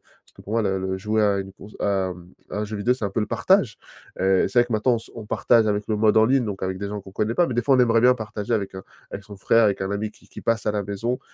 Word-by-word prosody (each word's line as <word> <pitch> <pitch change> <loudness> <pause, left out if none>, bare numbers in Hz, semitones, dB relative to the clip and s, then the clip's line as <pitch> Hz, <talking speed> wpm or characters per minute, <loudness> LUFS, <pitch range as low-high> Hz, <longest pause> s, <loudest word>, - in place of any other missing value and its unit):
parce - - -30
que - - -15
pour 105 - -8
moi 115 - +2
le 95 -1 0
le 95 0 -3
jouer 110 +2 0
à 100 -1 +2
une 95 0 -6
conso 105 +2 -14
à, 95 -2 0
mmh, 90 0 -14 0.2
à - - -4
un 105 - -1
jeu 105 0 -5
vidéo, 120 +5 +1
c'est 115 - -6
un 100 - -1
peu 110 - -1
le 105 - -1
partage. 145 - +2 0.4
Heu, 95 0 +3
c'est 120 - +1
vrai 120 - +2
que, 120 - -6
maintenant, 115 +3 +2
on - - +1
s - - -14
on 115 -2 -8
partage 115 +1 +3
avec 105 0 0
le 110 - 0
mode 110 +1 +3
en 110 - +6
ligne, 130 0 +2
donc 100 -3 -5
avec 95 0 -2
des 100 - -4
gens 105 0 -5
qu'on 95 0 -14
connaît 110 +3 -1
pas, 175 - +3
mais, 125 - -4
des 120 - +1
fois, 135 +2 +4
on - - +1
aimerait 115 -2 +4
bien 125 +2 +5
partager 110 -1 -5
avec, 100 -3 -3
heu, 95 - -7 0.3
avec 100 - -7
son 100 0 -11
frère, 115 +4 +3
avec 100 -2 +1
un 95 - -3
ami 105 +1 -2
qui - - -23
qui - - -10
passe 115 -2 -1
à 105 - +2
la 105 -1 -1
maison 115 +6 -3
105 Hz, 335 wpm, -23 LUFS, 100-115 Hz, 0.4 s, en